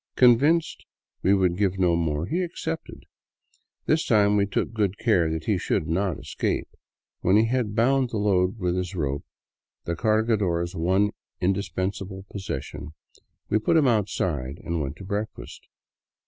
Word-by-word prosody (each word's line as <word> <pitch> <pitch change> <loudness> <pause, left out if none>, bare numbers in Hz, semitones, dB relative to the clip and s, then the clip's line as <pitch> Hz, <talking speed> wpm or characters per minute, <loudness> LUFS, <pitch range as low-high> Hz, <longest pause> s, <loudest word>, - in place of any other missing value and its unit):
Convinced 145 +7 +4 0.4
we 100 - +4
would 90 -3 +1
give 95 -2 +1
no 90 -2 +3
more, 80 -2 -1
he 170 - -1
accepted. 165 -2 -5 0.8
This 155 +1 +2
time 105 -3 +3
we 100 -1 +2
took 100 - -2
good 105 -3 0
care 95 -9 +2
he - - -1
should 75 - -1
not 90 +2 0
escape. - - -2 0.5
When 95 +3 +3
he 110 - +4
had 115 -3 -1
bound 130 +2 +3
the 110 - -3
load 100 0 +2
with 90 -3 -1
his 90 +1 -3
rope 70 -4 -2 0.3
— - - -67
the 85 - -2
cargador's 100 -4 +1
one 95 +5 +2 0.3
indispensable 95 +1 -2
possession 75 -5 -6 0.3
— - - -49
we 110 - +4
put 160 - +2
him 150 -4 +4
outside 95 - 0
and 85 -1 -1
went 70 -1 -4
to - - -11
breakfast. 105 +3 -5
100 Hz, 155 wpm, -25 LUFS, 85-110 Hz, 0.8 s, Convinced